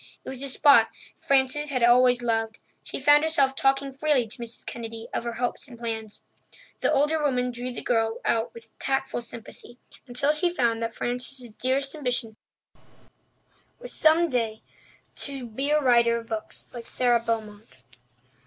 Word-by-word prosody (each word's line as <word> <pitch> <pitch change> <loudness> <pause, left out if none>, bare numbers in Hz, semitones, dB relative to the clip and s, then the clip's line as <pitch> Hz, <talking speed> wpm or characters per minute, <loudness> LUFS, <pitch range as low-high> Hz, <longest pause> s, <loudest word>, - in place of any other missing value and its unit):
It - - -6
was 260 -1 -7
a 275 - -3
spot 260 -4 +6 0.3
Frances 275 +2 +1
had 255 -4 0
always 245 +1 +5
loved. 225 -2 -1 0.2
She - - -6
found 295 0 +6
herself 305 -4 +2
talking 270 0 +1
freely 280 -2 +2
to 235 - -5
Mrs. 235 -1 -6
Kennedy 230 -1 -7
of - - -2
her 235 - -3
hopes 245 +4 -3
and 245 -3 -12
plans. 225 -2 -6 0.6
The - - +1
older 300 +3 +2
woman 250 -4 0
drew 245 +1 -5
the 245 - -6
girl 225 -2 0
out 225 0 +1
with 230 -1 -13
tactful 270 -2 -1
sympathy 235 +1 -11 0.3
until 255 +4 +1
she 345 +4 +1
found 235 -9 0
that 230 0 -3
Frances's 245 0 -3
dearest 265 +4 -1
ambition 250 -6 -3 1.4
was - - -8
some 320 +2 +4
day 230 -6 -2 0.5
to 275 -3 -4
be 265 +5 -3
a 300 0 +4
writer 235 -4 +4
of 230 -1 -8
books 220 -1 -5
like 235 -2 -7
Sara 245 -2 +3
Beaumont. 215 - -5
245 Hz, 160 wpm, -26 LUFS, 230-275 Hz, 1.4 s, spot